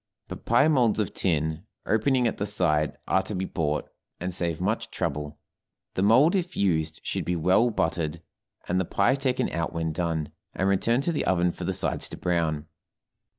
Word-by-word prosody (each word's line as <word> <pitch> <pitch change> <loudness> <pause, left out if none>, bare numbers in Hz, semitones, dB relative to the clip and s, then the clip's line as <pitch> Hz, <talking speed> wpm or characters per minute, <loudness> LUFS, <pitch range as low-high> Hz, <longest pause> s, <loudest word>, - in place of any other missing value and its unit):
But - - -8
pie 120 +6 +4
molds 125 -8 +3
of 105 - -1
tin, 80 -1 0 0.2
opening 125 +3 +2
at 115 - 0
the 105 - -2
side, 75 -7 +1
are 95 - +3
to 105 - -6
be 95 +1 -1
bought, 75 -5 -2 0.3
and 90 +1 -3
save 85 -2 -1
much 105 +5 -1
trouble; 75 +1 -3 0.6
the - - -1
mold, 125 - +5
if 180 -2 -1
used, 80 -5 +1
should - - -2
be 90 - -1
well 90 +8 +3
buttered, 85 -5 -1 0.4
and 90 +1 +1
the 95 - 0
pie 100 +7 +2
taken 135 -2 0
out 85 0 -2
when 80 -1 -1
done, 80 -2 -2 0.2
and 95 - 0
returned 115 +7 +2
to 170 - +1
the 155 - -1
oven 90 -1 +2
for - - -7
the - - -1
sides - - -1
to - - -8
brown. 80 -4 0
90 Hz, 190 wpm, -26 LUFS, 80-110 Hz, 0.6 s, mold